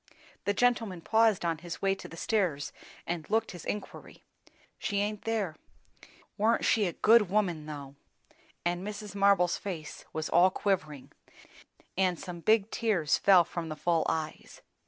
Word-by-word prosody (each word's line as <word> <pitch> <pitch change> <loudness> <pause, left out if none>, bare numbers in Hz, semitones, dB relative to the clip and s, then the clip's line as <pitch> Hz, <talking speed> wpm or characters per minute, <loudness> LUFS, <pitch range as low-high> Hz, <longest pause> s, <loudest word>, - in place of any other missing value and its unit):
The 205 - +2
gentleman 225 -7 +1
paused 220 -2 +3
on 165 -2 0
his 170 +1 -7
way 195 0 +2
to 195 - -8
the 165 - -11
stairs 175 -9 -1 0.3
and 170 -2 -4
looked 225 +1 +1
his 175 -3 -9
inquiry. 210 - -6 0.6
"She 205 - -2
aint 205 0 -2
there. 215 -8 -1 0.8
Warn't 225 +3 +2
she 210 -4 +3
a 175 - -3
good 220 -4 +5
woman, 180 -7 0
though!" 140 -3 -7 0.7
And 175 0 0
Mrs. 210 +1 -6
Marble's 200 -3 +3
face 165 -7 -7
was 155 0 -3
all 175 +2 +5
quivering, 185 -8 -2 0.8
and 185 -2 +1
some 180 -3 -7
big 215 +3 +2
tears 200 -10 +1
fell 190 -3 +6
from 170 -1 -5
the 155 - -4
full 165 +1 +1
eyes. 160 -1 -5
185 Hz, 155 wpm, -30 LUFS, 165-210 Hz, 0.8 s, fell